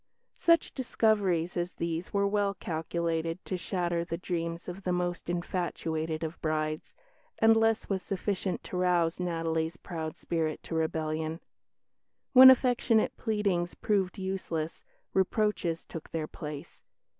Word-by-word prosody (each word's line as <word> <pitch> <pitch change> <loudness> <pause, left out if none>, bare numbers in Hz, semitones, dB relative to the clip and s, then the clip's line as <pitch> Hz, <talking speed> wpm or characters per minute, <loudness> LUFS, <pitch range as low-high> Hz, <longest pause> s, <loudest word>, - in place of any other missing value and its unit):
Such 335 -2 +3
discoveries 205 - +1
as 175 +1 -2
these 170 +1 -3
were 200 0 +2
well 200 -1 +1
calculated 165 -1 -2
to 185 - -2
shatter 175 -1 -1
the 165 0 -4
dreams 170 -1 -3
of 180 +2 -6
the 185 - -1
most 175 -1 -2
infatuated 165 -2 -2
of 160 +1 -5
brides, 155 0 -2 0.4
and 225 0 +6
less 225 0 +2
was 195 -2 -1
sufficient 190 0 -2
to 180 - -5
rouse 175 -2 +2
Natalie's 165 -1 -1
proud 160 -4 -5
spirit 160 -2 -2
to - - -7
rebellion. 160 0 -1 0.9
When 260 0 +12
affectionate 245 -3 +4
pleadings 200 -6 0
proved 195 -2 0
useless, 185 -4 -3 0.3
reproaches 190 -3 +1
took 165 - -8
their 160 -2 -2
place. 150 -1 -8
175 Hz, 130 wpm, -30 LUFS, 165-195 Hz, 0.9 s, When